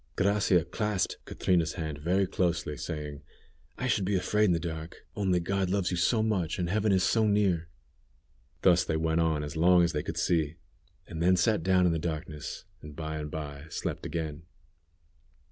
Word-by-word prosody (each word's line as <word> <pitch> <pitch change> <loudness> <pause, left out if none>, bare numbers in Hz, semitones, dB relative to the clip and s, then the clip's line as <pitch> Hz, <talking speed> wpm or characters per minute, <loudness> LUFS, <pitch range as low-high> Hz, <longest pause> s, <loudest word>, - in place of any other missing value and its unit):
Gracia 95 -3 +2
clasped 105 +2 -1
Catrina's 85 -4 +1
hand 80 -4 -4
very 90 +6 +2
closely, 85 -4 -1
saying: 75 -2 -5 0.6
"I 125 - -3
should 110 -5 +1
be 100 +2 0
afraid 105 +4 +2
in 95 - +3
the 85 - +2
dark, 80 -1 -6
only 95 -3 +1
God 95 +2 -1
loves 95 -2 0
you 90 - -1
so 110 +6 +2
much, 95 -7 0
and 85 -1 -1
heaven 110 +1 +2
is 95 -1 +3
so 110 +6 +3
near." 95 -5 +2 1.0
Thus 90 -1 +5
they 80 -2 -1
went 80 +1 +1
on 80 -2 +1
as 75 +2 -6
long 90 +2 +5
as 85 - +1
they 75 - 0
could - - -5
see, 80 -3 +1 0.5
and 80 -1 -6
then 90 +2 +4
sat 105 +2 +2
down 90 +1 +3
in 90 - +3
the 80 - 0
darkness, 80 -2 -5 0.2
and 75 -1 -10
by 80 0 -4
and 75 0 -5
by 75 -1 -6
slept - - -4
again. 80 -1 -4
85 Hz, 185 wpm, -29 LUFS, 80-95 Hz, 1.0 s, Thus